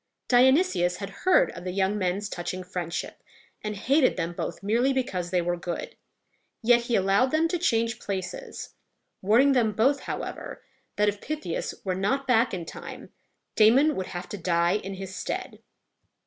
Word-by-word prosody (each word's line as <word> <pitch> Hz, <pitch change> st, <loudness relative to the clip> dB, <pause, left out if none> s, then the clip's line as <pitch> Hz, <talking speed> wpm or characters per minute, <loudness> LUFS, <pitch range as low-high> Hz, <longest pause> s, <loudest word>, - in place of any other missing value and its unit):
Dionysius 255 Hz, -, +4 dB
had 200 Hz, -1 st, -6 dB
heard 375 Hz, -, +3 dB
of -, -, -9 dB
the 185 Hz, -, -4 dB
young 190 Hz, +2 st, +1 dB
men's 195 Hz, +1 st, -1 dB
touching 185 Hz, 0 st, -5 dB
friendship, 175 Hz, -2 st, -5 dB, 0.4 s
and 210 Hz, 0 st, -3 dB
hated 265 Hz, +7 st, +2 dB
them 170 Hz, +1 st, -2 dB
both 175 Hz, -, -5 dB
merely 235 Hz, +6 st, +2 dB
because 190 Hz, -10 st, -2 dB
they 180 Hz, -1 st, +1 dB
were 175 Hz, 0 st, 0 dB
good; 175 Hz, 0 st, -5 dB, 0.7 s
yet 240 Hz, +1 st, +5 dB
he 240 Hz, -, 0 dB
allowed 195 Hz, +5 st, +3 dB
them 315 Hz, +4 st, +2 dB
to 355 Hz, 0 st, -1 dB
change 230 Hz, -6 st, +1 dB
places, 190 Hz, -3 st, -6 dB, 0.5 s
warning 235 Hz, +8 st, +4 dB
them 235 Hz, -5 st, +2 dB
both, 270 Hz, +7 st, +3 dB
however, -, -, -6 dB, 0.3 s
that, 210 Hz, 0 st, +2 dB
if 205 Hz, 0 st, -1 dB
Pythias 300 Hz, -, -4 dB
were 190 Hz, -, -1 dB
not 230 Hz, +9 st, 0 dB
back 250 Hz, -1 st, +3 dB
in 180 Hz, -3 st, -4 dB
time, -, -, -9 dB, 0.4 s
Damon 260 Hz, +8 st, +5 dB
would 185 Hz, -, -3 dB
have 175 Hz, 0 st, -6 dB
to 205 Hz, -, -6 dB
die 170 Hz, +2 st, +2 dB
in 195 Hz, -1 st, -6 dB
his 190 Hz, 0 st, -7 dB
stead. -, -, -5 dB
205 Hz, 165 wpm, -26 LUFS, 185-255 Hz, 0.7 s, yet